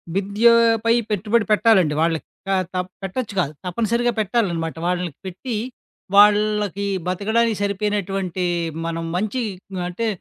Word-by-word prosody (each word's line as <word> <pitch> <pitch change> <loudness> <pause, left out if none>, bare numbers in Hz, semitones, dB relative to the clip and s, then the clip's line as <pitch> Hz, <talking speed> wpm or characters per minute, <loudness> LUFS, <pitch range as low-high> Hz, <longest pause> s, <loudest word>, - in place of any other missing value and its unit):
విద్యోపై 230 +3 +4 0.2
పెట్టుబడి 210 +2 +1
పెట్టాలండి, 205 -8 +4
వాళ్ళకి. 165 -1 0 0.2
కా 195 - +2 0.2
తప్ 180 0 -2
పెట్టొచ్చు 205 +3 -4
కాదు, 155 -3 0
తప్పనిసరిగా 235 +6 0
పెట్టాలనమాట. 180 -7 0
వాళ్ళకి 180 -4 -2
పెట్టి, 215 +6 -5 0.6
వాళ్ళకి 210 -1 +4 0.2
బతకడానికి 220 +4 +1
సరిపోయినటువంటి 195 -3 -1 0.4
మనం 165 0 -3
మంచి 215 +6 -1 0.5
అంటే 225 +6 -3
205 Hz, 105 wpm, -21 LUFS, 180-225 Hz, 0.6 s, విద్యోపై